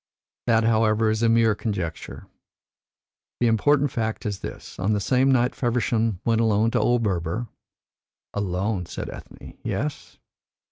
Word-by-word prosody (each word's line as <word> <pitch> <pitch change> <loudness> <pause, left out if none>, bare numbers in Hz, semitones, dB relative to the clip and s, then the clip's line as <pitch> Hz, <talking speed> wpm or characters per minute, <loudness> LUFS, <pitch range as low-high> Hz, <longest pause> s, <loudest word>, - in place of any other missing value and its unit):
That, 115 -1 +4
however, 110 -1 +3
is 110 +1 -1
a 115 - +3
mere 115 -1 +4
conjecture. 95 -6 -4 1.1
The 120 - +2
important 140 +5 +3
fact 110 +1 -3
is 100 -2 -2
this. - - -9
On 100 +4 +1
the 105 - +1
same 130 +5 +2
night 125 0 +2
Feversham 115 -4 0
went 115 -1 +2
alone 110 0 +2
to - - +1
old 120 -1 +2
Berber." 95 +3 -2 0.8
"Alone!" 95 -1 -2
said - - -6
Ethne. - - -12
"Yes?" 150 +2 -4
110 Hz, 140 wpm, -24 LUFS, 105-120 Hz, 1.1 s, That